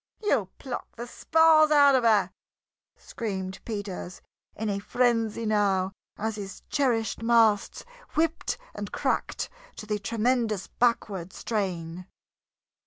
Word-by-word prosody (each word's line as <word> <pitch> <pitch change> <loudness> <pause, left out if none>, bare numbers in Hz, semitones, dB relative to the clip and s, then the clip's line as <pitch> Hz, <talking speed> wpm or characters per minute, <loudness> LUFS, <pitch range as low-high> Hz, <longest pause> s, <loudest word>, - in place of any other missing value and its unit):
"You'll 220 - +2
pluck 255 -3 -7
the 235 - -6
spars 320 +4 +4
out 285 -2 +6
of 260 -2 +3
her!" 220 -3 +4 0.7
screamed 190 -4 -5
Peters, 200 -4 -5 0.4
in 220 - -3
a 200 -1 -1
frenzy 230 0 +1
now 200 -3 +2 0.3
as 220 0 -3
his 195 -2 -8
cherished 240 -7 0
masts 225 -3 +3 0.3
whipped 320 +1 0 0.2
and - - -6
cracked - - -1 0.3
to - - -8
the 210 -1 -2
tremendous 225 -1 0
backward 205 -7 0
strain. 180 -5 -3
220 Hz, 115 wpm, -27 LUFS, 200-245 Hz, 0.7 s, out